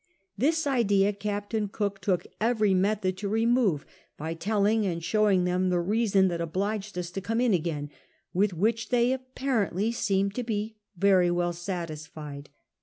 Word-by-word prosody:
This 315 +9 +1
idea 205 -7 +3
Captain 205 +1 -2
Cook 200 -1 -3
took 180 -1 0 0.2
every 215 -3 +2
method 190 0 +1
to 200 +1 -3
re 225 +2 +1
move, 230 - +2 0.3
by 160 +2 -4
telling 210 +5 +1
and 170 -4 -2
showing 205 -1 +3
them 180 +1 +1
the 180 -1 +2
reason 195 +1 +2
that 170 -1 -3
obliged 195 +4 -2
us 175 -1 -3
to 195 - -4
come 225 +4 -1
in 245 -3 +3
again, 155 -4 -2 0.4
with 195 +3 +2
which 220 +6 0
they 245 0 +3
apjiarently 255 -6 -1
seemed 200 -3 0
to 250 - -3
be 220 -1 -3 0.2
very 185 -1 +4
well 175 0 0
satisfied. 155 -5 -6
200 Hz, 160 wpm, -27 LUFS, 180-220 Hz, 0.4 s, very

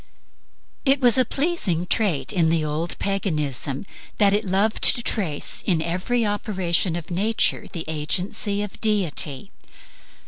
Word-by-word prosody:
It 275 -1 +3
was 245 -2 +5
a 255 - +4
pleasing 270 - 0
trait 185 -3 0
in 170 -4 +2
the 160 -1 +1
old 155 +3 -3
Paganism 150 - -2 0.3
that 200 -2 +4
it 210 +1 +1
loved 195 +4 0
to 240 - -4
trace 170 -12 -1
in 175 -5 +1
every 185 +9 -1
operation 190 -4 -1
of 170 +1 -7
nature 210 +6 0
the 165 -5 -5
agency 180 +6 -1
of 210 - -9
deity. 195 -6 -1
190 Hz, 135 wpm, -23 LUFS, 165-215 Hz, 0.3 s, was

